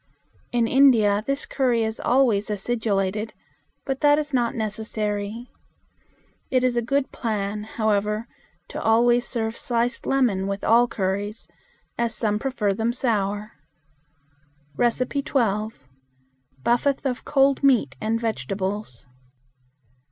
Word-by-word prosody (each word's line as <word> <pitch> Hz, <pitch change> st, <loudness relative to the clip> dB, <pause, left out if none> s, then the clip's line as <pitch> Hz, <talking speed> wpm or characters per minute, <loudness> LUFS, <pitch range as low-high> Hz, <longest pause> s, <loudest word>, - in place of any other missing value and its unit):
In 235 Hz, -1 st, +2 dB
India 225 Hz, -6 st, +4 dB
this 275 Hz, 0 st, 0 dB
curry 245 Hz, -4 st, +1 dB
is 220 Hz, 0 st, -3 dB
always 240 Hz, -5 st, +2 dB
acidulated, 210 Hz, -1 st, -1 dB, 0.5 s
but 270 Hz, -1 st, -3 dB
that 290 Hz, -1 st, +5 dB
is 300 Hz, -1 st, -3 dB
not 240 Hz, -2 st, +1 dB
necessary. 215 Hz, +1 st, -3 dB, 1.0 s
It 255 Hz, -1 st, +2 dB
is 250 Hz, -1 st, +2 dB
a 240 Hz, -, +2 dB
good 275 Hz, +3 st, 0 dB
plan, 210 Hz, -2 st, -3 dB
however, 215 Hz, 0 st, -1 dB, 0.4 s
to -, -, -5 dB
always 240 Hz, +2 st, +3 dB
serve 225 Hz, -2 st, -2 dB
sliced 240 Hz, -2 st, -1 dB
lemon 230 Hz, -8 st, +1 dB
with 200 Hz, 0 st, -4 dB
all 235 Hz, +2 st, +5 dB
curries, 205 Hz, +1 st, -3 dB, 0.5 s
as 235 Hz, -1 st, 0 dB
some 210 Hz, -2 st, 0 dB
prefer 225 Hz, -6 st, 0 dB
them 225 Hz, +4 st, -1 dB
sour. 210 Hz, -4 st, -1 dB, 1.2 s
12. 240 Hz, -, 0 dB, 0.8 s
Buffath 275 Hz, +4 st, +1 dB
of 255 Hz, -2 st, -2 dB
Cold 275 Hz, -1 st, +3 dB
Meat 270 Hz, -5 st, +3 dB
and 220 Hz, +1 st, 0 dB
Vegetables. 195 Hz, -, -3 dB
225 Hz, 115 wpm, -24 LUFS, 210-250 Hz, 1.2 s, that